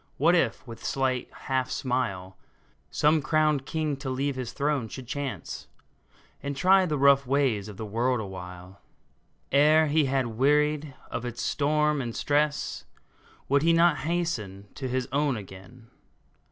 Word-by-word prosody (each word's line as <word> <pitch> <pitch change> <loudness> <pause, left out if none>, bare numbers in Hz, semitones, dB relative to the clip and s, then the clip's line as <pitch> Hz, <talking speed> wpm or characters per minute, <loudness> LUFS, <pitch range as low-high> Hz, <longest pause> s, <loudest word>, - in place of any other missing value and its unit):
What 165 +4 +4
if, 170 - +1
with 115 -2 -10
slight 130 -2 -1
half 130 -2 -2
smile, 100 -8 -2 0.5
Some 150 - +3
crowned 155 -2 +1
king 155 -2 -1
to 140 -1 -5
leave 135 +2 -1
his 130 -3 -4
throne 145 -4 -1
should 130 +3 -8
chance, 140 +2 -5 0.7
And 140 0 -4
try 185 +4 +5
the 150 -2 -1
rough 140 -1 +5
ways 130 -7 +1
of 105 -2 -9
the 110 - -5
world 120 +4 0
awhile? 90 -1 -9 0.7
Ere 150 +3 +5
he 155 0 +2
had 135 -1 +1
wearied 145 +4 +1 0.2
of - - -3
its 120 -1 -5
storm 150 0 +1
and 120 -3 -5
stress, 145 0 0 0.6
Would 140 +1 +3
he 165 +2 +4
not 165 -1 +4
hasten 120 - -3
to 135 - -4
his 130 0 -1
own 140 -2 +1
again 105 +4 -12
135 Hz, 150 wpm, -27 LUFS, 120-150 Hz, 0.7 s, try